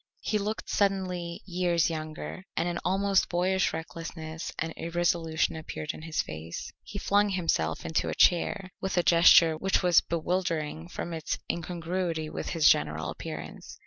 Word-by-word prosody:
He 215 - 0
looked 210 +2 -3
suddenly 185 -4 -1
years 175 -3 +1
younger, 155 +4 -6
and 165 - +1
an 170 -1 -2
almost 195 +1 +2
boyish 185 +2 +1
recklessness 160 0 -6
and 160 0 -3
irresolution 165 -2 0
appeared 155 -1 -5
in - - -10
his 160 -1 -1
face. 80 +2 -7
He 200 - -8
flung 205 +1 +2
himself 165 - 0
into 160 - 0
a - - -3
chair 185 +2 +3
with 190 -1 -2
a 175 - +4
gesture 165 -1 +7
which 190 +4 +1
was 175 -2 +6
bewildering 165 -2 -2
from 175 - -5
its 160 -2 -2
incongruity 170 -1 -2
with - - -4
his 165 -4 +3
general 75 +1 +2
appearance. - - -8
170 Hz, 150 wpm, -28 LUFS, 160-185 Hz, -, gesture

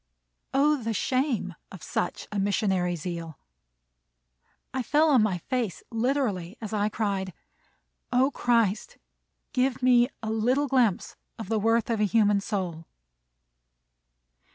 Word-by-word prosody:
O, 295 +3 +3
the 225 -1 -2
shame 255 -6 0 0.2
of 190 - -11
such 175 - -3
missionary 195 -3 +1
zeal! 165 -2 -6 1.4
I 260 - -1
fell 300 +6 +3
on 260 -5 +5
my 205 -4 +1
face 230 +2 -3
literally, 225 -6 -1
as 220 -2 -6
I 210 0 +1
cried, 195 -4 -2 0.8
"O 260 +3 +3
Christ, 230 -6 +1 0.6
give 255 -1 0
me 245 -1 +5
a 220 - -2
little 250 +6 +1
glimpse 245 -8 +1 0.2
of 225 -4 -7
the 220 -1 +1
worth 225 +2 +2
of 225 - 0
a 210 - +3
human 205 -1 +3
soul!" 180 -6 -4
220 Hz, 125 wpm, -27 LUFS, 195-250 Hz, 1.4 s, on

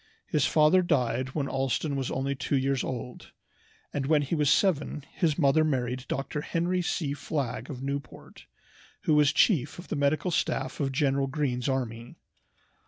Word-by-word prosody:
His 150 -3 +1
father 155 +4 +5
died 130 -6 0
when 145 -3 0
Allston 135 +2 -1
was 135 -2 -2
only 135 +1 -1
two 135 +1 -1
years 135 -1 0
old, 125 -1 -6 0.6
and 135 -2 -2
when 150 -1 +3
he 140 - -4
was 150 -3 +2
seven 150 -4 +1
his 160 -5 0
mother 150 0 +4
married 130 -3 -1
Dr. 140 +2 -3
Henry 175 +3 0
C. 155 -4 -1
Flagg 140 -4 -3
of 130 -3 -6
Newport, 140 -2 -6 0.5
who 155 - +1
was 150 -2 +5
chief 150 - +2
of 175 - -10
the - - -2
medical 145 +4 +1
staff 135 -4 -1
of 140 -2 0
General 135 0 +1
Greene's 135 -3 -1
army. 120 -3 -3
140 Hz, 165 wpm, -28 LUFS, 130-150 Hz, 0.6 s, father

